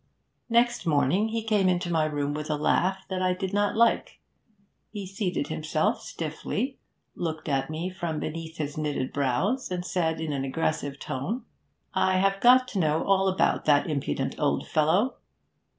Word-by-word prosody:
Next 240 -3 +2
morning 155 +7 +3
he 225 0 -2
came 210 -4 +2
into 175 -1 0
my 160 -2 +2
room 145 -1 -1
with 150 +1 -5
a 150 - +1
laugh 180 +5 +1
that 185 -1 -3
I 185 0 +2
did 190 +1 -4
not 205 0 +1
like; 235 0 +2 0.7
he 205 -3 -6
seated 185 -6 -2
himself 155 0 0
stiffly, 200 - -4 0.3
looked 160 -2 -4
at 135 -1 0
me 165 +4 -3
from 170 -4 -3
beneath 160 +1 -5
his 150 -1 -3
knitted 145 -4 -2
brows, 145 - 0
and 180 -1 -3
said 160 -3 0
in 160 -2 -2
an 135 -1 -2
aggressive 145 0 -2
tone: 185 - -4 0.5
'I 185 0 +2
have 195 +1 +2
got 255 +1 +6
to 200 - -2
know 155 -1 +2
all 195 0 +3
about 190 0 +1
that 145 +1 +4
impudent 150 -4 -1
old - - 0
fellow.' 175 +11 +2
175 Hz, 165 wpm, -27 LUFS, 150-195 Hz, 0.7 s, got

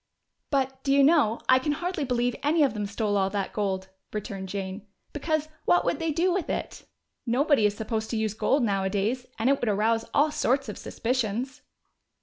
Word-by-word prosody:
"But, 265 -1 -1
do 275 - 0
you 275 0 +5
know, 275 -7 +4
I 255 0 +6
can 290 +3 0
hardly 345 -1 -2
believe 245 -1 0
any 300 +2 +3
of 275 - +2
them 210 -2 -3
stole 205 0 -1
all 190 -1 +2
that 200 -1 -3
gold," 190 -2 -2 0.2
returned 195 -2 -5
Jane. 195 +1 -5 0.3
"Because, 310 +1 -1 0.2
what 175 0 +3
would 170 - 0
they 325 -1 0
do 345 +4 +2
with 370 -2 -2
it? - - -4 0.4
Nobody 260 -1 +3
is 205 0 -4
supposed 220 0 -3
to 230 - -1
use 220 -1 0
gold 270 +5 +1
nowadays, 205 +4 0
and 225 - 0
it 275 0 +3
would 240 - 0
arouse 225 +2 +1
all 295 +2 +3
sorts 275 -4 0
of 210 - -6
suspicions." 245 +1 -2
235 Hz, 190 wpm, -27 LUFS, 205-280 Hz, 0.4 s, I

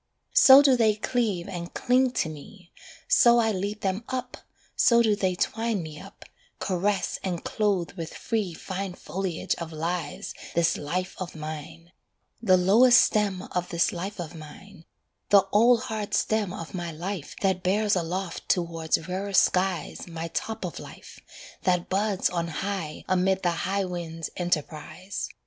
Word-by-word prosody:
So 270 +1 +9
do 270 -2 +5
they 220 -3 +3
cleave 215 -5 -1
and 175 -3 -7
cling 255 +1 +3
to - - 0
me, 170 +4 -11 0.4
So 240 - +6
I 225 -2 +3
lead 205 +2 -3
them 195 +3 -1
up, 255 -1 -4 0.4
so 235 -1 +5
do 215 -2 +3
they 190 -3 0
twine 225 0 -1
Me 155 -1 -8
up, - - -13 0.3
caress 190 +1 -1
and 180 -3 -3
clothe 195 -7 0
with 165 -3 -7
free 210 -7 -2
Fine 190 +1 -5
foliage 185 -3 -3
of 165 -1 -6
lives 165 0 -4 0.2
this 170 -1 +3
life 180 +5 -3
of 185 -3 -6
mine; 155 +2 -8 0.5
The 185 -5 +5
lowest 230 +7 +6
stem 205 -3 +1
of 180 0 -2
this 170 0 +1
life 190 +3 -5
of 170 -1 -5
mine, 165 +3 -12 0.4
The 200 -2 +6
old 235 +3 +5
hard 215 -2 -3
stem 215 -4 0
of 170 -4 -7
my 175 -2 -4
life 175 0 -5
That 190 -2 +1
bears 205 +3 +2
aloft 180 +1 -3
towards 165 -2 0
rarer 195 +2 -3
skies 185 -4 +1
My 165 -1 -5
top 220 +4 -4
of 175 - -6
life, - - -12 0.4
that 180 -1 +1
buds 200 0 +1
on 170 -1 -2
high 170 -2 -4
Amid 185 +1 +1
the 175 - +2
high 195 +3 -1
wind's 165 -3 -5
enterprise. 170 +1 -3
185 Hz, 155 wpm, -26 LUFS, 170-205 Hz, 0.5 s, So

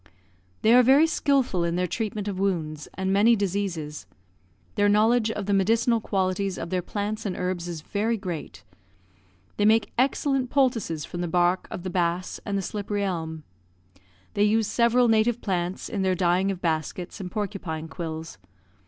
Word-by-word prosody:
They 220 - +6
are 250 - +8
very 270 +5 +6
skilful 275 - +1
in 170 0 0
their 180 +1 +1
treatment 210 +2 -3
of 195 -2 -3
wounds, 160 -6 -2
and 190 0 -1
many 220 +4 +5
diseases. 185 -7 -3 0.7
Their 205 -1 +3
knowledge 220 +2 +3
of 205 -3 -3
the 205 - 0
medicinal 225 +4 +2
qualities 190 -1 -1
of - - -6
their 185 -1 0
plants 210 +4 -3
and 195 -4 -3
herbs 180 -1 -2
is 170 -3 -5
very 215 +7 -1
great. 165 - -6 0.9
They 205 - +2
make 220 0 +3
excellent 270 -1 +1
poultices 235 - +1
from 175 - -6
the 175 - -1
bark 175 +2 +1
of 175 - -6
the 185 - -4
bass 175 0 -1
and 200 -1 0
the 195 - -2
slippery 205 +1 -3
elm. 160 -4 -3 0.9
They 205 - +2
use 220 +1 +3
several 240 +2 +3
native 225 +1 +3
plants 180 -3 -2
in 205 -4 -3
their 190 -1 +2
dyeing 180 +2 +2
of 190 -2 -3
baskets 165 +4 -2
and 185 -2 -5
porcupine 185 -6 -4
quills. 160 - -6
195 Hz, 170 wpm, -25 LUFS, 175-220 Hz, 0.9 s, are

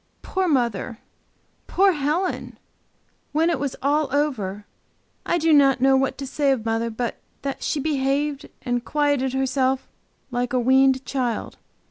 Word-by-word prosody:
Poor 375 -1 -1
mother! 240 - 0 0.7
Poor 390 +1 +4
Helen! 315 +4 -2 0.8
When 325 +3 +3
it 325 - -1
was 275 -1 -2
all 295 +2 +2
over, 215 -9 -1 0.6
I 345 - +2
do 325 -1 +3
not 275 -3 +5
know 270 +1 +4
what 270 0 +1
to 275 - -5
say 280 +1 0
of 240 -4 -1
mother 225 +1 0
but 230 +1 -4 0.2
that 275 -1 -3
she 300 - -1
behaved 285 0 -1
and 245 -1 -1
quieted 285 -3 +1
herself 265 0 0 0.4
like 245 0 -2
a 255 - +3
weaned 265 +1 +4
child. 250 -5 -2
270 Hz, 145 wpm, -23 LUFS, 250-295 Hz, 0.8 s, not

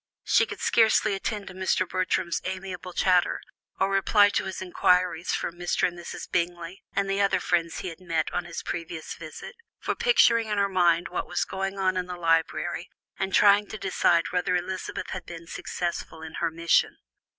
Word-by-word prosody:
She - - +3
could - - -8
scarcely 220 -2 +4
attend 200 +1 -3
to 190 - -8
Mr. 185 0 0
Bertram's 185 -1 -1
amiable 185 -1 -5
chatter, 180 0 +2 0.4
or 195 +1 +2
reply 205 +1 +5
to - - -1
his 190 - -5
inquiries 180 -2 +1
for - - -2
Mr. 175 +1 0
and 175 - -7
Mrs. 175 0 -7
Bingley, 175 +1 -2
and 200 0 +1
the 195 +1 0
other 200 - +2
friends 170 -2 0
he 185 - -4
had 165 - -10
met 165 -4 -2
on 180 - -1
his 170 -1 -6
previous 165 -1 -5
visit, - - -9 0.2
for - - -2
picturing 475 - +4
in 210 -1 -1
her 200 0 +3
mind 175 -3 +2
what 180 - -3
was - - -1
going 195 +1 -4
on 185 -1 +1
in 180 -1 -2
the 180 -1 -6
library 165 -1 0 0.3
and 190 0 -1
trying 205 +1 +5
to 215 - -7
decide 180 -3 +2
whether 180 0 +1
Elizabeth 185 +1 -4
had 185 - -5
been 170 -1 -9
successful 170 -1 -4
in 160 - -8
her 170 - +2
mission. 165 +1 +2
185 Hz, 185 wpm, -26 LUFS, 170-195 Hz, 0.4 s, reply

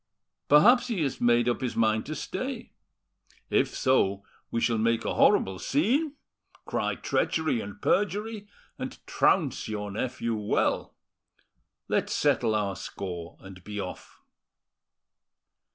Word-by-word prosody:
Perhaps 240 - +6
he 210 -9 -1
has 135 - -3
made 120 0 +4
up 120 - 0
his 125 -2 -2
mind 110 -1 +1
to - - -4
stay. - - -5 0.8
If - - +2
so, 100 -7 +2 0.3
we 115 - -1
shall 115 -1 +1
make 115 +1 +1
a - - 0
horrible 95 -1 +3
scene, 265 - +1 0.5
cry - - -1
treachery 160 -8 0
and 100 0 -8
perjury, 210 +1 0 0.3
and - - -5
trounce - - +1
your 105 -2 -4
nephew 115 +2 -2
well. 105 -1 0 0.9
Let's - - 0
settle 110 - +2
our 100 -2 -1
score 90 -3 -7
and 95 -2 -12
be 105 +1 -6
off." 90 -2 -7
115 Hz, 125 wpm, -27 LUFS, 105-155 Hz, 0.9 s, Perhaps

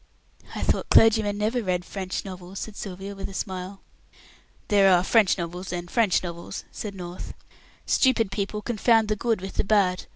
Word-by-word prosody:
"I - - -3
thought - - 0
clergymen 220 -2 +5
never 220 +4 0
read 180 -4 -1
French 190 -1 -4
novels," 185 0 -8
said 220 - -6
Sylvia, 195 0 -6
with 195 0 -6
a 195 - -10
smile. 190 +1 -5 0.9
"There 200 -2 +5
are 180 -1 +5
French 210 -1 +4
novels 175 +1 -5
and 175 -1 -5
French 220 -7 +2
novels," 170 -1 -6
said 205 -2 -6
North. 180 -1 -7 0.5
"Stupid 230 -6 +2
people 205 +1 -3
confound 225 -1 +2
the 215 - +2
good 225 -2 -1
with 190 0 -7
the - - +2
bad. 195 -3 +2
195 Hz, 170 wpm, -25 LUFS, 185-215 Hz, 0.9 s, clergymen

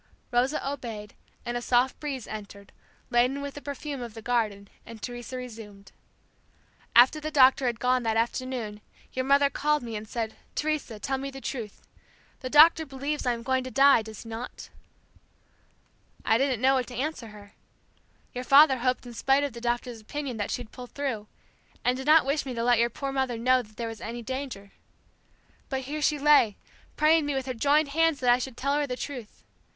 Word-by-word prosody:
Rosa 255 +4 +1
obeyed, 230 -7 -6 0.3
and 240 - -3
a 240 - -2
soft 245 +2 +2
breeze 275 -6 -4
entered, 200 -2 -9 0.4
laden 250 +3 +2
with 280 0 -5
the 290 - -9
perfume 285 -1 -5
of 235 -2 -7
the 225 - -8
garden, 215 -5 -1 0.2
and 230 0 -11
Teresa 245 +2 -6
resumed; 215 -5 -10 1.0
"After 255 +6 +7
the 305 0 -4
doctor 265 -3 +5
had 235 -2 -2
gone 250 0 +2
that 225 -1 0
afternoon 230 -2 -2 0.3
your 260 0 -2
mother 280 +1 +5
called 300 -1 +1
me 230 -2 -5
and 215 +1 -6
said, 225 -2 -3 0.2
Teresa, 300 -7 -2
tell 265 +6 -2
me 275 +1 -4
the 270 0 -9
truth. 235 -6 -6 0.6
The 255 - -5
doctor 320 +3 +7
believes 280 0 -4
I 245 - +3
am 230 0 -7
going 260 +1 0
to 255 - -6
die; 275 -2 +5
does 220 -1 -9
he 230 - -11
not?' 230 +2 -7 1.5
I 225 - +3
didn't 260 -4 0
know 265 +1 +5
what 255 -2 0
to 245 - -9
answer 270 -1 -3
her. 205 -1 -14 0.8
Your 250 - -4
father 275 0 +6
hoped 255 +1 0
in 240 - -9
spite 270 +4 +2
of 285 -4 -2
the 235 - -9
doctor's 240 -1 -2
opinion 265 +2 -5
that 205 -2 -2
she'd 245 -3 -4
pull 250 -1 -9
through, 245 -7 -4 0.6
and 250 +1 +3
did 265 +2 -6
not 310 -1 +6
wish 280 +2 0
me 260 -3 -6
to 230 - -2
let 240 -1 +4
your 235 0 +3
poor 275 +4 -4
mother 265 -3 -1
know 255 +2 +3
that 215 -2 -17
there 235 - -3
was 225 -1 -8
any 235 +1 -6
danger. 255 -6 -6 1.0
But 265 -1 -2
here 295 +4 -5
she 300 0 +2
lay 285 -8 +4 0.4
praying 310 0 +4
me 290 - -1
with 265 -1 -2
her 260 - -3
joined 290 +5 +2
hands 325 0 +2
that 245 -1 +4
I 245 - +4
should 255 -1 -6
tell 280 +2 0
her 290 0 +1
the 250 -1 -4
truth. 250 -7 -7
255 Hz, 200 wpm, -27 LUFS, 230-280 Hz, 1.5 s, After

